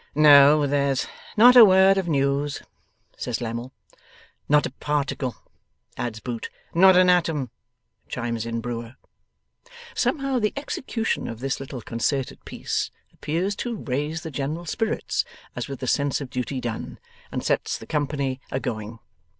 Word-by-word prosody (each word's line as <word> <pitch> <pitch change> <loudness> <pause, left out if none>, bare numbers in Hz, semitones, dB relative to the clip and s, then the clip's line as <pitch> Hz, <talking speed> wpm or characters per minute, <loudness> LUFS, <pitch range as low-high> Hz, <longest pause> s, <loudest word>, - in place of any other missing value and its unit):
'No, 145 0 +7
there's 140 -1 +1 0.3
not 245 +3 +8
a 245 - +11
word 190 -1 +6
of 185 - -3
news,' 140 -1 0 0.5
says 120 -2 -3
Lammle. 120 +1 -4 0.8
'Not 150 0 +4
a - - -4
particle,' 140 -2 -2 0.6
adds 115 -3 -4
Boots. 120 0 -5 0.2
'Not 185 +2 +7
an 185 0 +6
atom,' 165 -8 +2 0.6
chimes 115 -2 -3
in 115 0 -3
Brewer. 120 +1 -5 1.0
Somehow 275 -5 0
the 210 -2 0
execution 255 -5 -2
of 115 -1 -6
this 135 +2 -2
little 135 -3 -7
concerted 130 +3 -2
piece - - -3 0.2
appears 180 +6 -2
to 240 -1 -3
raise 150 +2 -3
the 160 - -6
general 150 +5 -3
spirits 225 +6 -1 0.3
as - - -4
with 135 -2 -7
a - - -2
sense 140 +2 +1
of 135 -3 -7
duty 130 +1 -3
done, 120 -3 -5 0.3
and - - -3
sets - - 0
the - - -11
company 140 -3 -2
a 130 - -2
going. 110 -2 -5
140 Hz, 145 wpm, -24 LUFS, 125-170 Hz, 1.0 s, a